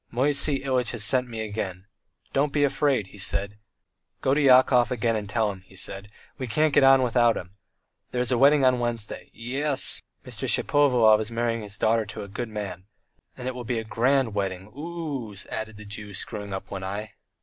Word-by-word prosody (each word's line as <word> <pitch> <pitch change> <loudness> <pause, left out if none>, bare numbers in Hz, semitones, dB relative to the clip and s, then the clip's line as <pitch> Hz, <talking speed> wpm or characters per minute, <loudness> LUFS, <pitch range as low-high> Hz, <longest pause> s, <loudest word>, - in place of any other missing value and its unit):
"Moisey 140 +2 +1
Ilyitch 130 -3 0
has 115 -3 0
sent 125 +3 +3
me 115 -1 -5
again. 100 -4 -5 0.5
'Don't 140 +1 +1
be 145 0 +1
afraid,' 135 -5 +1
he 105 - -13
said; 100 +2 -2 0.6
'go 135 - +1
to 150 - +2
Yakov 125 -3 +5
again 115 -2 0
and 105 -2 -4
tell 110 -1 +1
him,' 95 -2 -11
he 95 - -18
said, 95 +2 -5 0.3
'we 130 - -3
can't 155 +5 +1
get - - +5
on 135 -1 +6
without 120 -1 +3
him.' 90 +2 -9 0.5
There 125 - -3
is 125 - -1
a 125 - +3
wedding 140 0 +5
on 130 -1 +3
Wednesday.... 120 -3 -3
Ye 125 +5 -5
es! 145 -3 +4 0.2
Mr. - - -3
Shapovalov 125 -7 +4
is 110 - -4
marrying 115 0 -1
his 105 -1 -7
daughter 110 -1 +1
to 105 - -7
a - - -8
good 110 +4 -5
man.... 100 -4 -6 0.5
And 125 - -6
it 130 - -2
will 125 0 -6
be 120 0 -2
a 115 - -2
grand 120 +2 +1
wedding, 95 0 -3
oo 150 -6 -5
oo!" - - -13 0.2
added 110 -1 -5
the 105 - -11
Jew, 105 -1 -7
screwing 105 0 -4
up 95 +1 -6
one 95 -1 -5
eye. 100 +2 -5
115 Hz, 205 wpm, -25 LUFS, 105-130 Hz, 0.6 s, on